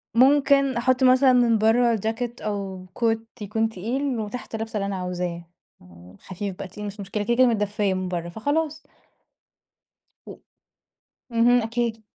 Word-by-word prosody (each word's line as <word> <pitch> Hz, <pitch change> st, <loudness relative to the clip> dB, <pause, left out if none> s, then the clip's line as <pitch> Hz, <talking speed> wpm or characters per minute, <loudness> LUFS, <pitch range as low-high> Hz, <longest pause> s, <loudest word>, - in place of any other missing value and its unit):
ممكن 275 Hz, +1 st, +4 dB
أحط 255 Hz, +2 st, +2 dB
مثلًا 255 Hz, 0 st, +6 dB
من 235 Hz, -2 st, +4 dB
برّا 230 Hz, +2 st, +3 dB
جاكيت 225 Hz, +3 st, -3 dB
أو 195 Hz, -3 st, -4 dB
Coat 225 Hz, -1 st, +2 dB, 0.2 s
يكون 220 Hz, +2 st, -1 dB
تقيل 240 Hz, +5 st, -2 dB
وتحت 220 Hz, +2 st, -6 dB
لابسة 225 Hz, 0 st, -4 dB
اللي 200 Hz, -, -1 dB
أنا 200 Hz, -1 st, -3 dB
عاوزاه، 180 Hz, -2 st, -4 dB, 0.4 s
آآ 90 Hz, +1 st, -16 dB
خفيف 190 Hz, 0 st, -6 dB
بقى -, -, -7 dB
تقيل 210 Hz, +2 st, -8 dB
مش 205 Hz, +1 st, -7 dB
مشكلة 200 Hz, +1 st, -3 dB
كده، 235 Hz, +2 st, +1 dB
كده 255 Hz, 0 st, +5 dB
متدفيّة 210 Hz, -3 st, 0 dB
من 185 Hz, 0 st, -3 dB
برّا 170 Hz, -1 st, -4 dB
فخلاص. 290 Hz, -, -2 dB, 1.4 s
و -, -, -9 dB, 0.9 s
اهم، 240 Hz, +1 st, +4 dB
أكيد. 230 Hz, 0 st, -2 dB
225 Hz, 150 wpm, -24 LUFS, 195-245 Hz, 1.4 s, مثلًا